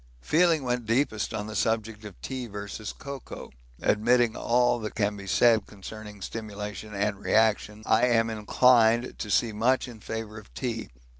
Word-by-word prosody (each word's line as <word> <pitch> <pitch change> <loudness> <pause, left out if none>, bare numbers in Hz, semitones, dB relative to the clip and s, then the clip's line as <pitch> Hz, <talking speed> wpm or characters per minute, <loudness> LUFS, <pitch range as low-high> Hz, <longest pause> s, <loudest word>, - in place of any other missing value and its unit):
Feeling 165 -2 +3
went 125 -2 -2
deepest 115 -2 0
on 105 -2 -3
the 110 0 -7
subject 110 0 -1
of 100 -4 -10
tea 130 -2 -4
versus 105 +1 -6
cocoa; 140 -3 -9 0.3
admitting 120 +2 +3
all 120 0 +2
that 110 -1 -6
can 105 -1 0
be 100 -1 -9
said 110 +1 +4
concerning 105 0 -10
stimulation 105 -1 -6
and 100 0 -1
reaction, 110 -1 +1
I 115 +3 +4
am 115 -2 +2
inclined 115 +2 +3
to 105 - -4
see 110 +2 +2
much 125 +5 +1
in 120 -3 -10
favour 110 0 -6
of 105 - -17
tea. 115 -4 -3
110 Hz, 160 wpm, -27 LUFS, 105-120 Hz, 0.3 s, said